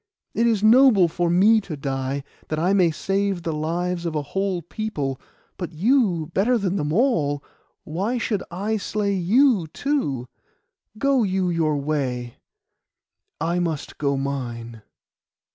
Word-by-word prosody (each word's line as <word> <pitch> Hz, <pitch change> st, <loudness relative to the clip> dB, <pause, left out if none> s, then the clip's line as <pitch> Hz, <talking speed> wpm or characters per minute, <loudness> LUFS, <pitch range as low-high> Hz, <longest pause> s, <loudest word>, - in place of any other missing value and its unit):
It 230 Hz, +1 st, +2 dB
is 220 Hz, -3 st, +1 dB
noble 225 Hz, -4 st, +6 dB
for 175 Hz, +1 st, -1 dB
me 210 Hz, +6 st, +5 dB
to 165 Hz, -6 st, -7 dB
die, 135 Hz, 0 st, -3 dB, 0.2 s
that 155 Hz, -, -2 dB
I 175 Hz, +5 st, +2 dB
may 185 Hz, -4 st, +4 dB
save 195 Hz, +2 st, -1 dB
the 165 Hz, -, -2 dB
lives 170 Hz, +3 st, -2 dB
of 165 Hz, -2 st, -3 dB
a 150 Hz, -, -1 dB
whole 190 Hz, +3 st, -2 dB
people; 145 Hz, -9 st, -4 dB, 0.4 s
but 175 Hz, -2 st, -5 dB
you, 180 Hz, -, +2 dB
better 240 Hz, +6 st, +3 dB
than 195 Hz, -3 st, -1 dB
them 150 Hz, -5 st, -1 dB
all, 155 Hz, -, +1 dB, 0.4 s
why 195 Hz, +10 st, -2 dB
should 215 Hz, -4 st, -1 dB
I 200 Hz, +5 st, -2 dB
slay 205 Hz, 0 st, -1 dB
you 200 Hz, -, +3 dB
too? 150 Hz, -, -2 dB, 0.7 s
Go 275 Hz, +2 st, +2 dB
you 190 Hz, -3 st, 0 dB
your 155 Hz, -3 st, +1 dB
way; 130 Hz, -5 st, -2 dB, 1.0 s
I 170 Hz, +3 st, 0 dB
must 165 Hz, -4 st, -3 dB
go 140 Hz, -2 st, +1 dB
mine. 120 Hz, -5 st, -4 dB
175 Hz, 145 wpm, -23 LUFS, 150-205 Hz, 1.0 s, noble